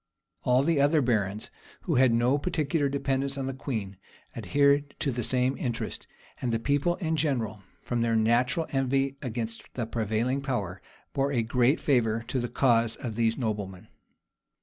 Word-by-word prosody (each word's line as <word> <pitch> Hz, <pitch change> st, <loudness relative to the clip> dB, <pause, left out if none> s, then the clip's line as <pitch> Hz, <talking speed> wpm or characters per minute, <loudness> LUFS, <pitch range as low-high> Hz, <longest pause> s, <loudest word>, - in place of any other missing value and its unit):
All 125 Hz, +1 st, +3 dB
the 155 Hz, -2 st, +2 dB
other 150 Hz, +3 st, +4 dB
barons, 110 Hz, -4 st, 0 dB, 0.3 s
who 170 Hz, -, -1 dB
had 130 Hz, -2 st, +5 dB
no 120 Hz, +5 st, +2 dB
particular 150 Hz, -2 st, 0 dB
dependence 135 Hz, 0 st, -1 dB
on 135 Hz, -, -2 dB
the 135 Hz, -, -3 dB
queen, 110 Hz, -8 st, -4 dB, 0.4 s
adhered 145 Hz, 0 st, +2 dB
to 140 Hz, -, +1 dB
the 120 Hz, 0 st, -2 dB
same 130 Hz, +2 st, +1 dB
interest; 120 Hz, -3 st, -4 dB, 0.3 s
and 125 Hz, -, -1 dB
the 115 Hz, -, +1 dB
people 145 Hz, +8 st, +1 dB
in 160 Hz, -3 st, -1 dB
general, 120 Hz, -9 st, -1 dB, 0.2 s
from 120 Hz, -1 st, -1 dB
their 115 Hz, -1 st, +2 dB
natural 125 Hz, +9 st, +2 dB
envy 135 Hz, 0 st, +1 dB
against 115 Hz, -3 st, -5 dB
the 120 Hz, -, -1 dB
prevailing 115 Hz, +4 st, -1 dB
power, 100 Hz, -10 st, -3 dB, 0.3 s
bore 140 Hz, -2 st, +1 dB
great 125 Hz, +5 st, +2 dB
favor 115 Hz, -4 st, +1 dB
to 130 Hz, -, 0 dB
the 120 Hz, 0 st, -2 dB
cause 115 Hz, -3 st, +2 dB
of 120 Hz, -5 st, -5 dB
these 115 Hz, 0 st, +1 dB
noblemen. 105 Hz, -6 st, -4 dB
125 Hz, 160 wpm, -28 LUFS, 115-140 Hz, 0.4 s, had